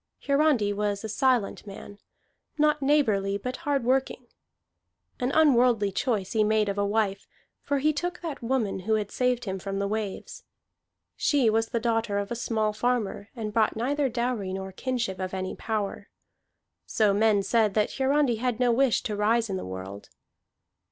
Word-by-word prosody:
Hiarandi 280 -8 +2
was 205 0 -2
a 220 - -4
silent 245 -3 0
man, 200 +1 -10 0.6
not 300 0 +2
neighborly, 215 -9 +2
but 250 +5 -5
hard 285 -5 -1
working. 260 +2 0 0.9
An 250 +1 0
unworldly 245 -9 +4
choice 205 -2 -1
he 220 -1 +2
made 215 -1 +2
of 200 0 -2
a - - +2
wife, 205 -2 -1 0.3
for 285 - -1
he 305 +3 +2
took 355 +4 -3
that 325 -5 -5
woman 230 -5 -1
who 220 +4 0
had 210 -2 -2
saved 250 -1 0
him 190 -1 -3
from 195 +1 -4
the 200 0 -1
waves; 210 -1 -5 0.7
she 265 -7 +2
was 225 +1 +1
the 235 - -2
daughter 225 -2 0
of 200 +1 -3
a - - -1
small 220 -2 -1
farmer 220 -3 -1
and 215 -3 -5
brought 220 -1 +2
neither 275 +5 0
dowry 235 -5 -2
nor 190 0 -5
kinship 235 -3 -3
of 185 0 -3
any 185 0 -4
power. 215 -3 -4 0.8
So 210 -2 +2
men 205 -1 +3
said 215 0 +2
that 210 -1 +2
Hiarandi 270 -3 +2
had 245 0 -1
no 250 -1 +3
wish 255 0 +2
to 210 - -3
rise 220 +1 +1
in - - -1
the 185 - -5
world. 95 +2 -8
225 Hz, 170 wpm, -27 LUFS, 200-255 Hz, 0.9 s, unworldly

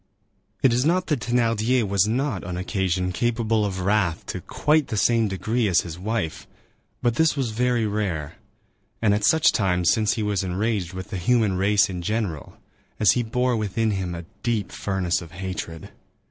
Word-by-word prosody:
It 130 - +5
is 125 +1 +2
not 180 +4 +2
that 150 -7 0
Thénardier 115 0 +1
was 100 0 +2
not, 125 -2 -1
on 90 0 -5
occasion, 90 -1 -1
capable 115 +1 0
of 95 -2 -2
wrath 95 -4 +1
to 90 - -5
quite 150 - +1
the 110 - -3
same 115 +2 +3
degree 110 +4 -1
as 90 -4 +3
his 85 0 -8
wife; 105 -4 -3 0.6
but 120 -1 +1
this 160 -2 +3
was 130 -5 -1
very 120 0 +1
rare, 95 -8 -2 0.7
and 105 -3 +3
at 105 0 0
such 160 +8 +5
times, 90 -4 +2
since 110 -3 +2
he 110 - -2
was 100 -2 0
enraged 95 0 -1
with 95 0 -7
the 95 - -2
human 105 +1 +2
race 100 +2 +3
in 90 -3 -5
general, 100 -6 -3 0.4
as 105 - +6
he 125 - +1
bore 125 +2 0
within 110 +1 0
him 95 -3 -3
a 85 0 -7 0.2
deep 115 -5 -1
furnace 90 -5 -1
of 85 -2 -11
hatred. 90 -3 -6
105 Hz, 180 wpm, -24 LUFS, 95-115 Hz, 0.7 s, as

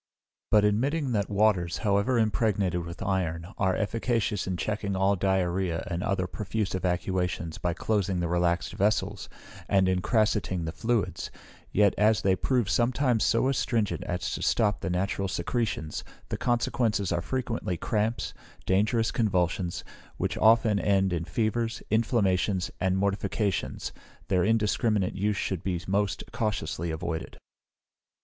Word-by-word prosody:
But 105 -1 +5
admitting 135 +7 +1
that 105 -4 0
waters, 100 -4 +2
however 100 +5 +2
impregnated 105 -5 +1
with 85 - -7
iron, 85 -3 -1
are 95 -1 +2
efficacious 110 -2 -1
in 95 -1 -2
checking 100 0 -2
all 95 +1 +3
diarrhoea 95 -2 0
and 85 +1 -1
other 95 -2 0
profuse 105 +2 -3
evacuations, 90 -2 -1
by 85 -1 -1
closing 100 -2 0
the 85 - 0
relaxed 85 0 0
vessels, 100 -1 0 0.4
and 95 -1 +4
incrassating 95 -1 +1
the 80 - -3
fluids, 105 +6 -1 0.4
yet 100 -1 +4
as 105 -2 +3
they 95 -1 +4
prove 125 +1 +1
sometimes 120 +1 +2
so 115 +3 +3
astringent 115 -5 0
as 90 0 -2
to - - -4
stop 105 -3 +2
the 95 - -2
natural 95 +2 -1
secretions, 95 -3 -2 0.3
the - - -2
consequences 115 -4 0
are 85 - 0
frequently 115 -5 -2
cramps, 110 +4 -1 0.3
dangerous 110 +4 +2
convulsions, 90 -5 0 0.3
which - - -1
often 110 -2 +5
end 95 -1 +2
in 85 -1 -2
fevers, 115 +5 -1
inflammations, 100 -4 +1
and 95 0 +1
mortifications, 100 0 -1 0.4
their 90 -2 +3
indiscriminate 105 -2 +1
use 100 +1 0
should 95 -5 -2
be 90 -3 -1
most 100 0 0
cautiously 85 -6 -2
avoided. 80 0 -4
100 Hz, 135 wpm, -28 LUFS, 90-110 Hz, 0.4 s, But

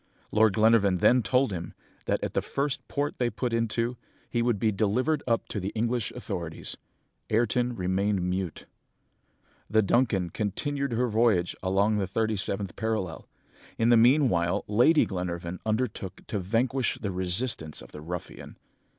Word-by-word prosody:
Lord 110 -1 +4
Glenarvan 110 -3 +4
then 125 +8 +4
told 125 +3 +2
him, 85 -2 -5 0.3
that - - 0
at - - -3
the - - +1
first 140 0 -2
port 145 0 -2
they 120 -1 +2
put 120 +2 -3
into, 115 +1 0 0.3
he 120 - +1
would 120 -2 +1
be 110 +2 +1
delivered 125 +9 +1
up 115 -1 +1
to 105 - -3
the 95 +1 -3
English 115 -1 -1
authorities. 90 -9 -5 0.5
Ayrton 120 +2 +1
remained 95 +1 0
mute. 90 -2 -3 1.0
"The 110 0 +4
Duncan 100 -5 +1
continued 140 - -2
her 125 +2 +1
voyage 110 -6 +2
along 100 +3 +2
the 95 - -1
thirty 110 +3 0
seventh 100 0 -1
parallel. 110 -6 -3 0.5
In 115 +1 +2
the 120 - +7
meanwhile, 115 - +3
Lady 125 +10 +4
Glenarvan 90 -1 -4
undertook 110 -4 -2
to 105 - -3
vanquish 115 +6 0
the 100 -3 -3
resistance 90 - -2
of - - -12
the 75 - -9
ruffian. 90 +3 -7
110 Hz, 150 wpm, -27 LUFS, 95-120 Hz, 1.0 s, the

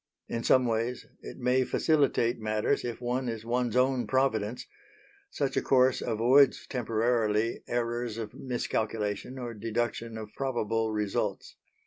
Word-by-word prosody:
In 115 - -3
some 130 -1 +4
ways 115 +1 -1 0.2
it - - -9
may 125 +1 +2
facilitate 135 -5 +2
matters 110 -1 0
if 120 -2 -4
one 125 +1 -1
is 115 -1 -5
one's 120 0 0
own 130 0 +2
Providence; 125 -4 0 0.6
such 140 - -2
a - - +2
course 130 -1 +3
avoids 125 +4 +4
temporarily 115 -2 0
errors 120 -1 -2
of 110 -2 -5
miscalculation 110 -2 -3
or 120 -2 -5
deduction 115 +1 -3
of 110 -1 -8
probable 115 -4 -1
results. 105 -2 -2
120 Hz, 130 wpm, -29 LUFS, 110-125 Hz, 0.6 s, some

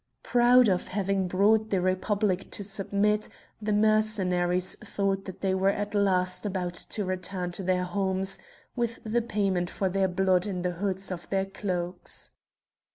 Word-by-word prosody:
Proud 245 0 +5
of 185 -3 +1
having 195 -1 0
brought 215 +4 +3
the 195 - +1
Republic 185 +1 0
to 205 - -3
submit, 205 +2 0 0.3
the 210 0 -1
Mercenaries 195 -4 +2
thought 195 -2 -2
that 190 - -8
they 190 -1 +1
were 190 +1 +3
at 205 +1 -2
last 185 -3 +1
about 185 -4 -2
to 205 +3 -2
return 185 -1 -3
to 175 - -4
their 185 -1 +1
homes 190 +1 -2 0.4
with 235 -2 -1
the 225 +2 +1
payment 195 -6 0
for 190 0 -1
their 190 +1 +2
blood 185 +1 +2
in 180 -3 -3
the 180 - 0
hoods 190 +2 -2
of 175 -1 -6
their 195 -1 +1
cloaks. 180 -3 -4
195 Hz, 160 wpm, -28 LUFS, 185-205 Hz, 0.4 s, Proud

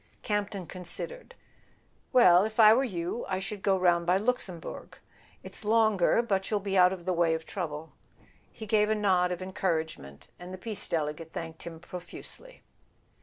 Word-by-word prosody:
Camp 205 -1 0
ton 195 -4 -6
considered. 185 - -6 0.8
"Well, 185 -7 +7
if 220 +2 -4
I 215 -1 +9
were 260 +4 +3
you, 180 -1 -3
I 190 - 0
should 195 +1 -5
go 195 -1 +2
round 175 -2 +2
by 180 +1 +4
Luxembourg—it's 205 -3 -6
longer, 215 -1 +3
but 195 -4 -1
you'll 210 - +1
be 195 -1 -3
out 180 -1 +6
of 180 -3 -6
the 185 - +1
way 170 -1 +2
of 160 0 -6
trouble." 160 -4 -5 0.6
He 220 - -9
gave 210 0 +2
a 220 - +2
nod 185 -4 +2
of 180 0 -4
encour¬ 185 -3 0
agement, 70 - -11 0.2
and 180 +1 -9
the 185 - -6
Peace 210 +1 -3
Delegate 155 0 -3
thanked 165 -1 -6
him 165 -1 -8
pro¬ 175 +1 -8
fusely. - - -11
185 Hz, 175 wpm, -29 LUFS, 170-210 Hz, 0.8 s, I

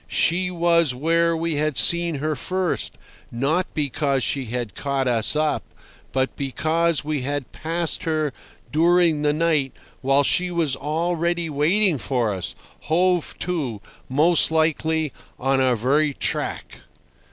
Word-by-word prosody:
She 180 +3 +1
was 170 -5 +2
where 165 +4 +1
we 165 -2 -2
had 150 -1 0
seen 170 -1 +4
her 155 +2 -2
first, 185 +5 -2 0.3
not 145 +10 0
because 140 -2 0
she 135 -2 -1
had 120 -1 -4
caught 140 -2 -2
us 115 +2 +2
up, 155 0 +1 0.5
but 130 +1 -1
because 155 +4 0
we 150 -2 -2
had 145 0 -3
passed 165 +1 -2
her 155 -4 0 0.4
during 170 0 +3
the 150 0 +2
night 155 -3 +1 0.3
while 135 +1 +3
she 180 +6 +2
was 165 -6 0
already 170 +3 -1
waiting 165 +3 +2
for 120 -4 -1
us, 90 -3 -4 0.3
hove 175 +1 +1
to, 150 - -2 0.3
most 160 +6 +4
likely, 160 -1 0 0.2
on 135 +1 +1
our 130 -2 +3
very 140 +5 +1
track. - - -3
155 Hz, 135 wpm, -22 LUFS, 135-170 Hz, 0.5 s, seen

